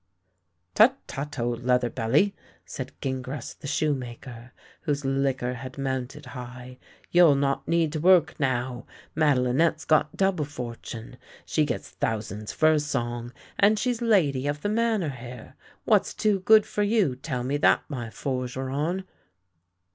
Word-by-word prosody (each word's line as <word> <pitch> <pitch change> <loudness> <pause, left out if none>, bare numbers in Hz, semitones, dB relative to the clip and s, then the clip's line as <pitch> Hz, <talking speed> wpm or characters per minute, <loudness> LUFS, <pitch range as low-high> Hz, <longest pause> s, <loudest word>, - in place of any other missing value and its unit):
" 90 +1 -50
Tut, - - +6
tut, 145 +2 -6
old 120 0 -2
leather 125 -1 +2
belly," 150 - +2 0.3
said 130 -1 -6
Gingras 130 0 -4
the - - -7
shoe 150 +1 +1
maker, 120 -1 -8 0.3
whose 145 -2 -2
liquor 135 -2 0
had 130 +2 -8
mounted 135 +1 -3
high, 125 0 -9 0.2
" - - -30
you'll 175 -5 +6
not 140 0 0
need 165 -2 +1
to 155 - -2
work 175 0 +5
now. 130 -2 -1 0.3
Madelinette's 150 +2 +2
got 155 -1 +2
double 190 -6 +1
fortune. 120 -3 -7 0.3
She 155 - +1
gets - - -4
thousands 105 -1 -3
for 155 0 +4
a 155 - +3
song, 120 -5 -3 0.3
and 210 +2 +5
she's 245 +1 -1
lady 150 - +2
of 145 0 -2
the 205 - 0
Manor 220 -6 +1
here. 125 -2 -9 0.3
What's - - +3
too 210 -2 +2
good 215 +3 +6
for 210 - -3
you, 205 - +2
tell 130 -2 -4
me 135 +3 0
that, 145 - +4
my 125 -6 -5
forgeron! 135 +8 -3
135 Hz, 150 wpm, -26 LUFS, 125-155 Hz, 0.3 s, Tut